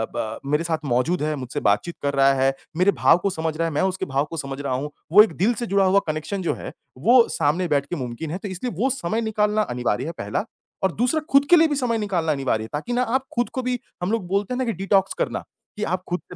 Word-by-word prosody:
ब 110 Hz, -1 st, -3 dB
मेरे 150 Hz, +2 st, +2 dB
साथ 160 Hz, -2 st, -2 dB
मौजूद 135 Hz, +7 st, +1 dB
है, 155 Hz, 0 st, 0 dB
मुझसे 130 Hz, -4 st, -5 dB
बातचीत 105 Hz, +12 st, +1 dB
कर 140 Hz, 0 st, 0 dB
रहा 135 Hz, 0 st, +5 dB
है, 135 Hz, 0 st, +2 dB, 0.2 s
मेरे 185 Hz, +3 st, +4 dB
भाव 175 Hz, -, +4 dB
को 200 Hz, -, +2 dB
समझ 160 Hz, -4 st, -3 dB
रहा 165 Hz, 0 st, +1 dB
है, 165 Hz, -, -4 dB
मैं 145 Hz, -, +1 dB
उसके 190 Hz, 0 st, -1 dB
भाव 140 Hz, +1 st, 0 dB
को 165 Hz, -, -5 dB
समझ 135 Hz, -2 st, -5 dB
रहा 140 Hz, -2 st, -2 dB
हूँ, 140 Hz, +4 st, -3 dB, 0.2 s
वो 210 Hz, +4 st, +9 dB
एक 215 Hz, -, -3 dB
दिल 210 Hz, +8 st, +3 dB
से -, -, -1 dB
जुड़ा 195 Hz, 0 st, +3 dB
हुआ 190 Hz, +1 st, +5 dB
कनेक्शन 155 Hz, +6 st, -3 dB
जो 175 Hz, -, 0 dB
है -, -, -7 dB, 0.3 s
वो 235 Hz, -, +5 dB
सामने 165 Hz, +3 st, +1 dB
बैठ 145 Hz, -3 st, +1 dB
के 175 Hz, -, -4 dB
मुमकिन 130 Hz, +2 st, -5 dB
है, 175 Hz, -, -2 dB
तो 200 Hz, -, -7 dB
इसलिए 190 Hz, +7 st, -4 dB
वो 260 Hz, +4 st, +2 dB
समय 225 Hz, -4 st, -1 dB
निकालना 215 Hz, -1 st, +1 dB
अनिवार्य 125 Hz, -, -1 dB
है 165 Hz, -, -3 dB
पहला -, -, -2 dB, 0.4 s
और 190 Hz, -, +3 dB
दूसरा 250 Hz, +7 st, +1 dB
खुद 275 Hz, +1 st, +5 dB
के 350 Hz, -, +9 dB
लिए 325 Hz, -1 st, +6 dB
भी 295 Hz, -, -1 dB
समय 245 Hz, -4 st, 0 dB
निकालना 185 Hz, -7 st, 0 dB
अनिवार्य 135 Hz, -6 st, 0 dB
है 110 Hz, -, -8 dB
ताकि 155 Hz, +12 st, -3 dB
ना 245 Hz, -, +2 dB
आप 265 Hz, 0 st, 0 dB
खुद 240 Hz, 0 st, +1 dB
को 260 Hz, -, -2 dB
भी 250 Hz, 0 st, -1 dB, 0.2 s
हम 180 Hz, -, 0 dB
लोग 225 Hz, -4 st, -1 dB
बोलते 200 Hz, +5 st, -1 dB
हैं -, -, -2 dB
ना 260 Hz, -, 0 dB
कि 230 Hz, -, 0 dB
डिटॉक्स 195 Hz, +1 st, +1 dB
करना, -, -, -1 dB, 0.4 s
कि 210 Hz, -, -3 dB
आप 185 Hz, -1 st, -1 dB
खुद 180 Hz, +1 st, -1 dB
से -, -, -7 dB
180 Hz, 270 wpm, -23 LUFS, 145-215 Hz, 0.4 s, वो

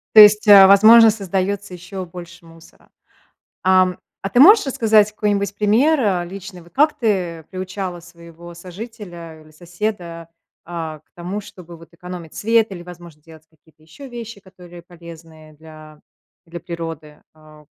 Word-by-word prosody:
То 215 Hz, -, +11 dB
есть, 210 Hz, +1 st, +6 dB
а, 200 Hz, -2 st, +9 dB
возможно, 220 Hz, +3 st, +7 dB
создается 195 Hz, -1 st, -4 dB
еще 185 Hz, +2 st, -8 dB
больше 175 Hz, -1 st, -13 dB
мусора. 165 Hz, 0 st, -20 dB, 0.8 s
Ам, 185 Hz, -1 st, +2 dB, 0.2 s
а 195 Hz, -, -3 dB
ты 220 Hz, -, 0 dB
можешь 410 Hz, -, +7 dB
рассказать 220 Hz, -5 st, +2 dB
какой-нибудь 205 Hz, -2 st, -2 dB
пример, 240 Hz, +10 st, +2 dB
а, 190 Hz, -6 st, 0 dB
личный, 185 Hz, 0 st, -11 dB
вот 170 Hz, -, -21 dB
как 300 Hz, +3 st, +1 dB
ты 180 Hz, -8 st, -2 dB
приучала 185 Hz, -1 st, -6 dB
своего 170 Hz, 0 st, -15 dB
сожителя 175 Hz, -3 st, -11 dB
или 155 Hz, -, -20 dB
соседа, 175 Hz, 0 st, -6 dB, 0.4 s
а, 160 Hz, -3 st, -7 dB
к -, -, -47 dB
тому, 180 Hz, +4 st, -6 dB
чтобы 175 Hz, -4 st, -14 dB
вот 165 Hz, 0 st, -17 dB
экономить 175 Hz, -1 st, -10 dB
свет 225 Hz, 0 st, +1 dB
или, 175 Hz, -2 st, -9 dB
возможно, 175 Hz, -3 st, -14 dB
делать 160 Hz, 0 st, -17 dB
какие-то 155 Hz, -1 st, -29 dB
еще 215 Hz, -, -14 dB
вещи, 230 Hz, -3 st, -9 dB
которые 180 Hz, -2 st, -15 dB
полезные 165 Hz, -2 st, -15 dB
для 155 Hz, 0 st, -15 dB, 0.5 s
для 170 Hz, 0 st, -9 dB
природы? 165 Hz, -3 st, -9 dB
А, 155 Hz, -1 st, -19 dB
180 Hz, 150 wpm, -19 LUFS, 165-205 Hz, 0.8 s, То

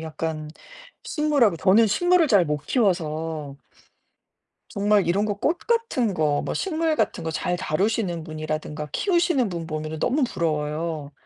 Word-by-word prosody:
약간 160 Hz, -1 st, -4 dB, 0.5 s
식물하고 290 Hz, -, +2 dB
저는 205 Hz, +6 st, +5 dB
식물을 350 Hz, -, +3 dB
잘못 160 Hz, -, +2 dB
키워서 160 Hz, -, -1 dB, 1.1 s
정말 205 Hz, -2 st, +2 dB
이런 190 Hz, +5 st, +2 dB
거 205 Hz, -, -1 dB
꽃 295 Hz, -, 0 dB
같은 455 Hz, -, 0 dB
거, 150 Hz, -3 st, +1 dB
뭐 -, -, -3 dB
식물 320 Hz, -4 st, 0 dB
같은 170 Hz, -, -1 dB
거 160 Hz, -, -2 dB
잘 175 Hz, +3 st, -1 dB
다루시는 180 Hz, 0 st, -1 dB
분이라든가 155 Hz, -1 st, -5 dB
키우시는 345 Hz, -, +1 dB
분 170 Hz, -3 st, -5 dB
보면은 155 Hz, 0 st, -4 dB
너무 265 Hz, -, +1 dB
부러워요. 155 Hz, -, -2 dB
175 Hz, 295 characters per minute, -24 LUFS, 155-240 Hz, 1.1 s, 저는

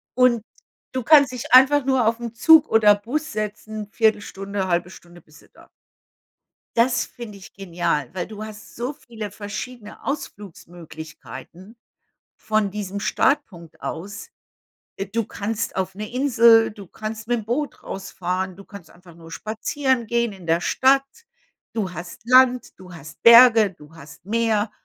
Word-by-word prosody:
Und 250 Hz, -3 st, +3 dB, 0.5 s
du 255 Hz, -2 st, -2 dB
kannst 285 Hz, -2 st, +6 dB
dich 250 Hz, 0 st, -6 dB
einfach 265 Hz, +2 st, +6 dB
nur 260 Hz, -4 st, +2 dB
auf 230 Hz, +1 st, 0 dB
'n 235 Hz, -1 st, -6 dB
Zug 320 Hz, +3 st, +6 dB
oder 210 Hz, -2 st, +5 dB
Bus 300 Hz, +9 st, -4 dB
setzen, 215 Hz, 0 st, -5 dB
1/4, 200 Hz, -3 st, -1 dB
1/2 175 Hz, 0 st, 0 dB
Stunde 175 Hz, -1 st, -15 dB
bist 155 Hz, 0 st, -20 dB
du -, -, -24 dB
da. -, -, -20 dB, 1.1 s
Das 245 Hz, +1 st, +3 dB
finde 220 Hz, -4 st, -10 dB
ich 190 Hz, -, -14 dB
genial, 175 Hz, -8 st, -2 dB
weil 180 Hz, -2 st, -4 dB
du 215 Hz, 0 st, -8 dB
hast 215 Hz, 0 st, -12 dB
so 250 Hz, +5 st, -3 dB
viele 230 Hz, -7 st, -8 dB
verschiedene 210 Hz, +2 st, -8 dB
Ausflugsmöglichkeiten 175 Hz, -, -9 dB, 0.6 s
von 215 Hz, -2 st, -1 dB
diesem 200 Hz, -1 st, -5 dB
Startpunkt 200 Hz, -, -1 dB
aus. 200 Hz, +7 st, -7 dB, 0.7 s
Äh, 195 Hz, -, -4 dB
du 225 Hz, +1 st, -2 dB
kannst 215 Hz, +2 st, -4 dB
auf 190 Hz, 0 st, -2 dB
'ne 215 Hz, +2 st, -7 dB
Insel, 235 Hz, -4 st, +5 dB
du 205 Hz, -2 st, -12 dB
kannst 220 Hz, +4 st, -7 dB
mit 240 Hz, 0 st, +1 dB
'nem 210 Hz, -, -10 dB
Boot 280 Hz, +6 st, -3 dB
rausfahren, 185 Hz, -1 st, -4 dB
du 200 Hz, -, -13 dB
kannst 200 Hz, -6 st, -13 dB
einfach 175 Hz, -1 st, -18 dB
nur 165 Hz, -1 st, -14 dB
spazieren 240 Hz, -, -2 dB
gehen 235 Hz, 0 st, 0 dB
in 190 Hz, -3 st, -13 dB
der 165 Hz, +1 st, +1 dB
Stadt. 270 Hz, +5 st, +3 dB, 0.7 s
Du 200 Hz, -5 st, -2 dB
hast 175 Hz, +2 st, -9 dB
Land, 255 Hz, 0 st, +4 dB
du 180 Hz, -1 st, -13 dB
hast 160 Hz, -1 st, -12 dB
Berge, 230 Hz, -3 st, +8 dB
du 155 Hz, -1 st, -18 dB
hast 140 Hz, 0 st, -14 dB
Meer 220 Hz, -1 st, 0 dB
215 Hz, 150 wpm, -22 LUFS, 185-240 Hz, 1.1 s, Berge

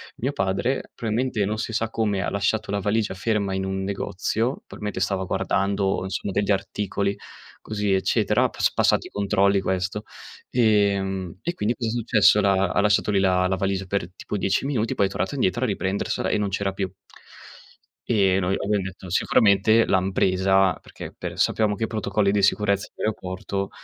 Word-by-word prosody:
mio 135 Hz, +4 st, -2 dB
padre 110 Hz, +2 st, -1 dB
probabilmente, 115 Hz, -1 st, -1 dB
non 110 Hz, +2 st, -2 dB
si 115 Hz, -, -3 dB
sa 115 Hz, 0 st, -1 dB
come, 105 Hz, -3 st, 0 dB
ha -, -, -2 dB
lasciato 100 Hz, +1 st, -1 dB
la 100 Hz, -, 0 dB
valigia 105 Hz, +1 st, 0 dB
ferma 100 Hz, -1 st, -1 dB
in 95 Hz, 0 st, -2 dB
un 95 Hz, 0 st, -2 dB
negozio, 100 Hz, +5 st, -2 dB
p -, -, -14 dB
mentre 105 Hz, 0 st, -4 dB
stava 95 Hz, -1 st, 0 dB
guardando 95 Hz, +1 st, 0 dB
insomma 95 Hz, +1 st, -4 dB
degli 100 Hz, 0 st, 0 dB
articoli 100 Hz, 0 st, -1 dB, 0.5 s
così 105 Hz, -2 st, -2 dB
eccetera, 95 Hz, 0 st, +2 dB
ha -, -, +1 dB
pass -, -, 0 dB
passato -, -, +2 dB
i -, -, -9 dB
controlli 100 Hz, -1 st, +2 dB
questo. 95 Hz, +3 st, -2 dB, 0.5 s
Ehm, 100 Hz, -6 st, +1 dB
e 175 Hz, -, -1 dB
quindi 115 Hz, -4 st, -1 dB
cosa 115 Hz, -2 st, -2 dB
è -, -, -2 dB
successo: 110 Hz, -3 st, +4 dB
l'ha 95 Hz, -2 st, +2 dB
ha 100 Hz, -, +2 dB
lasciato 105 Hz, +1 st, +2 dB
lì 100 Hz, -, +2 dB
la 90 Hz, -1 st, +3 dB
la 95 Hz, -, 0 dB
valigia 95 Hz, +1 st, -1 dB
per 95 Hz, -2 st, -3 dB
tipo 105 Hz, -, -5 dB
10 100 Hz, +6 st, 0 dB
minuti, 115 Hz, -6 st, -1 dB
poi 100 Hz, -, +2 dB
è -, -, -8 dB
tornato 95 Hz, +9 st, -3 dB
indietro 120 Hz, 0 st, 0 dB
a -, -, 0 dB
riprendersela 100 Hz, -1 st, -1 dB
e -, -, +1 dB
non 105 Hz, -1 st, -1 dB
c'era 95 Hz, 0 st, -1 dB
più. 95 Hz, 0 st, -3 dB, 1.2 s
E 95 Hz, -5 st, +3 dB
noi 95 Hz, +1 st, 0 dB
abbiam 105 Hz, -1 st, 0 dB
detto 95 Hz, 0 st, -8 dB
sicuramente 110 Hz, +4 st, +4 dB
l'han 95 Hz, 0 st, +1 dB
presa, 95 Hz, 0 st, +3 dB
perché -, -, -10 dB
per -, -, -6 dB
sappiamo 105 Hz, -2 st, +2 dB
che 115 Hz, -, -4 dB
i 110 Hz, -, +1 dB
protocolli 100 Hz, -2 st, 0 dB
di 100 Hz, -1 st, +1 dB
sicurezza 100 Hz, 0 st, +2 dB
in -, -, -6 dB
aeroporto 100 Hz, -1 st, -3 dB
100 Hz, 185 wpm, -24 LUFS, 95-105 Hz, 1.2 s, successo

